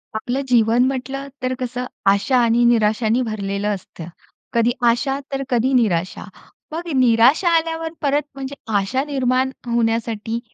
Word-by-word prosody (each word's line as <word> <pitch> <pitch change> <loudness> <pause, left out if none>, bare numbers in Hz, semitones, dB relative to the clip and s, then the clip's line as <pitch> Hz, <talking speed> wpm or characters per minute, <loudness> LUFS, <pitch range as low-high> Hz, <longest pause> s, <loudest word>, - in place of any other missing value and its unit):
आपलं 245 +5 -2
जीवन 235 0 +4
म्हंटल 270 +1 -4
तर 255 0 -1
कसं 250 0 -3 0.3
आशा 200 +6 +1
आणि 235 +1 +3
निराशांनी 225 +1 +2
भरलेलं 205 -3 -3
असतं. 170 -3 -11 0.5
कधी 235 +1 +3 0.2
आशा, 270 +4 0
तर 275 0 -1
कधी 250 +1 +1
निराशा. 185 -8 +1 0.5
मग 340 +2 -5
निराशा 255 +7 +4
आल्यावर 325 0 -3
परत 285 0 +2
म्हणजे 270 0 -6 0.2
आशा 255 +8 -1
निर्माण 260 -2 0 0.2
होण्यासाठी 230 -1 -1
245 Hz, 130 wpm, -20 LUFS, 225-270 Hz, 0.5 s, जीवन